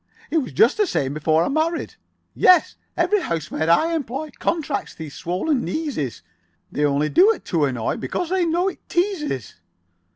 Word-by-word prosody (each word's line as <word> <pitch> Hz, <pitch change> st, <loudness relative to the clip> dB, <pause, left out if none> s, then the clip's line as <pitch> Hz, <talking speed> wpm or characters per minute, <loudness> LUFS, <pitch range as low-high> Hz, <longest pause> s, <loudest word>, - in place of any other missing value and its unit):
It 325 Hz, -, +3 dB
was 265 Hz, -, -4 dB
just 225 Hz, -, +4 dB
the 420 Hz, -2 st, +2 dB
same 135 Hz, -, -1 dB
before 155 Hz, +2 st, +2 dB
I -, -, -1 dB
married. 315 Hz, +3 st, -1 dB, 0.4 s
Yes, 365 Hz, -3 st, +5 dB, 0.2 s
every 420 Hz, -2 st, +2 dB
housemaid 160 Hz, -, -2 dB
I 320 Hz, -, +4 dB
employ. 290 Hz, 0 st, -3 dB
Contracts 305 Hz, -4 st, -2 dB
these 155 Hz, -3 st, -8 dB
swollen 240 Hz, -, -1 dB
kneeses. 270 Hz, -, -3 dB, 0.5 s
They 150 Hz, -, -1 dB
only 145 Hz, +1 st, +2 dB
do 370 Hz, +6 st, +6 dB
it -, -, -5 dB
to 160 Hz, -4 st, +3 dB
annoy. 125 Hz, -5 st, -2 dB
Because 355 Hz, -, -3 dB
they 375 Hz, -1 st, +2 dB
know 345 Hz, +3 st, +1 dB
it 390 Hz, -, -4 dB
teases." 345 Hz, -, -2 dB
280 Hz, 165 wpm, -22 LUFS, -, 0.5 s, do